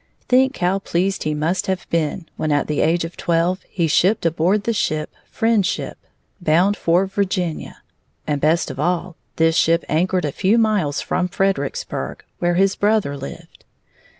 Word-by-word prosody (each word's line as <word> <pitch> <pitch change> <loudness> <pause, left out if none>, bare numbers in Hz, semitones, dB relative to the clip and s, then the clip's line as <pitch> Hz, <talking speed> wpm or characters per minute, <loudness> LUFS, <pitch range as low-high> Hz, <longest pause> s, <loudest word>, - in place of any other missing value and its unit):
Think 260 +1 +3
how 185 +2 +1
pleased 190 0 -1
he 155 0 0
must 160 +5 -1
have 190 -1 -2
been 165 +1 -1
when 155 - -2
at 145 0 +2
the 150 - -1
age 165 +2 +2
of 165 - -8
twelve 170 +2 0
he 170 - 0
shipped 185 +6 +2
aboard 170 +5 +2
the 230 - 0
ship 155 -7 -1 0.2
Friendship, 220 -4 0 0.5
bound 175 +5 +3
for 175 0 +2
Virginia! 185 -4 -3 0.4
And 145 -2 -1
best 155 -1 +2
of 135 - -9
all, 175 +2 -1 0.2
this 165 0 +3
ship 165 +1 +2
anchored 180 +2 +1
a 145 - -1
few 195 +10 +2
miles 205 -11 +1
from 180 0 -1
Fredericksburg, 195 - -2 0.2
where 175 0 +1
his 195 +2 +3
brother 205 -8 +1
lived. 140 0 -10
175 Hz, 160 wpm, -20 LUFS, 160-195 Hz, 0.5 s, Think